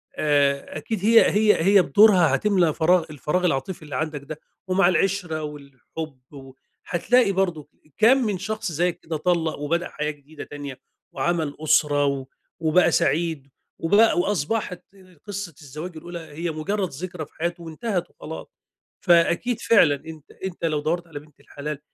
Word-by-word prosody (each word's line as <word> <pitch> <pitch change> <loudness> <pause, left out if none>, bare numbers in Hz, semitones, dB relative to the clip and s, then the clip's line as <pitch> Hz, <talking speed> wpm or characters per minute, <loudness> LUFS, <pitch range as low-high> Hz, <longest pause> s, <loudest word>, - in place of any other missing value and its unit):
آآ 145 -1 +1
أكيد 210 +8 -4
هي 230 +1 +6
هي 210 -4 +3
هي 200 0 +6
بدورها 185 -8 +5
هتملى 180 -2 +2
فراغ 170 +2 +3
الفراغ 155 +5 -1
العاطفي 165 +2 -1
اللي 150 - -7
عندك 155 -2 -3
ده، 155 +1 -8 0.3
ومع 185 -1 +3
العِشرة 180 -4 0
والحُب 145 0 -8
وهتلاقي 170 - -1
برضه 175 -6 -1 0.3
كام 235 +5 +6
من 205 -3 -1
شخص 215 0 -3
زيّك 175 +2 0
كده 160 -1 -4
طلَّق 165 0 0
وبدأ 170 +4 -1
حياة 150 0 -3
جديدة 145 +1 -12
تانية 145 -3 -8 0.3
وعمل 155 +1 -1
أسرة 150 -2 +3
و 140 -1 -1 0.3
وبقى 165 +2 +3
سعيد 165 -4 0 0.3
وبقى 205 +5 +4
وأصبَحِت 180 +1 -1
ال 185 -4 -20
قصّة 200 -5 -5
الزواج 155 +5 -8
الأولى 170 +2 -7
هي 165 +1 -5
مُجرّد 190 +5 -2
ذِكرى 175 +2 -6
في - - -32
حياته 170 +1 -3
وانتهت 175 +3 -3
وخلاص. - - -9 0.5
فأكيد 175 +6 +3
فعلًا 170 -10 +5
أنت 160 -2 -11
أنت 185 -3 -6
لو 155 -2 0
دوّرت 170 +3 -2
على 155 -3 -8
بِنت 150 0 -21
الحلال 150 0 -6
165 Hz, 150 wpm, -23 LUFS, 150-185 Hz, 0.5 s, هي